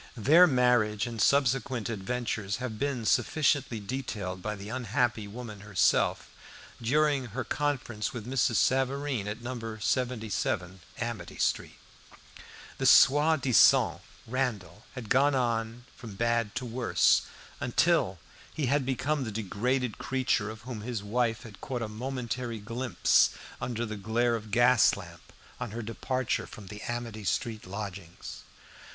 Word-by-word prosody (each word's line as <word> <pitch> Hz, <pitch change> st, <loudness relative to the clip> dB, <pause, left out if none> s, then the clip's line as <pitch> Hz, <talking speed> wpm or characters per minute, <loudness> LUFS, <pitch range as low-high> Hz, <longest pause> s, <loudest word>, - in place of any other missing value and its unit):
Their 155 Hz, -, +7 dB
marriage 125 Hz, -6 st, +2 dB
and 115 Hz, -3 st, -4 dB
subsequent 130 Hz, -4 st, +2 dB
adventures 110 Hz, -2 st, -3 dB
have 120 Hz, -4 st, -5 dB
been 135 Hz, -4 st, -1 dB
sufficiently 135 Hz, 0 st, +2 dB
detailed 100 Hz, -5 st, -4 dB
by 105 Hz, +2 st, -3 dB
the 100 Hz, 0 st, -9 dB
unhappy 115 Hz, -1 st, -1 dB
woman 110 Hz, -1 st, -8 dB
herself, 105 Hz, -2 st, +1 dB, 0.5 s
during 145 Hz, +2 st, +2 dB
her 120 Hz, +3 st, -4 dB
conference 135 Hz, -7 st, -2 dB
with 115 Hz, -4 st, -7 dB
Mrs. 125 Hz, -2 st, +1 dB
Savareen 135 Hz, -1 st, +1 dB
at 110 Hz, +3 st, -5 dB
No. 115 Hz, -3 st, -5 dB
77 110 Hz, -5 st, -1 dB, 0.2 s
Amity 115 Hz, -7 st, -5 dB
street. -, -, -1 dB, 1.0 s
The -, -, +2 dB
soi 150 Hz, +3 st, +6 dB
disant 125 Hz, -7 st, +5 dB, 0.2 s
Randall 110 Hz, -7 st, -3 dB
had 125 Hz, -4 st, -7 dB
gone 140 Hz, +5 st, +3 dB
on 115 Hz, -1 st, -1 dB
from 115 Hz, -5 st, -10 dB
bad 115 Hz, 0 st, 0 dB
to 125 Hz, 0 st, -3 dB
worse, 120 Hz, +1 st, +3 dB, 0.4 s
until 125 Hz, -, +2 dB, 0.3 s
he 150 Hz, -, -2 dB
had 135 Hz, +1 st, +1 dB
become 135 Hz, +3 st, 0 dB
the 110 Hz, -, -4 dB
degraded 115 Hz, +4 st, -1 dB
creature 125 Hz, -4 st, 0 dB
of 110 Hz, 0 st, -9 dB
whom 120 Hz, -3 st, -7 dB
his 115 Hz, -2 st, -4 dB
wife 115 Hz, +2 st, 0 dB
had 105 Hz, -4 st, -12 dB
caught 125 Hz, -3 st, -3 dB
a -, -, -3 dB
momentary 120 Hz, +1 st, -4 dB
glimpse 115 Hz, +4 st, +2 dB, 0.3 s
under 120 Hz, -1 st, -2 dB
the 110 Hz, -1 st, -5 dB
glare 115 Hz, +4 st, +1 dB
of 110 Hz, -1 st, -6 dB
gas 120 Hz, +2 st, +5 dB
lamp -, -, -12 dB, 0.3 s
on -, -, -4 dB
her 115 Hz, +3 st, -5 dB
departure 115 Hz, +4 st, -2 dB
from 100 Hz, -5 st, -11 dB
the 105 Hz, +1 st, -8 dB
Amity 120 Hz, -3 st, -4 dB
street 110 Hz, +1 st, -2 dB
lodgings. 95 Hz, -4 st, -7 dB
120 Hz, 135 wpm, -29 LUFS, 105-130 Hz, 1.0 s, Their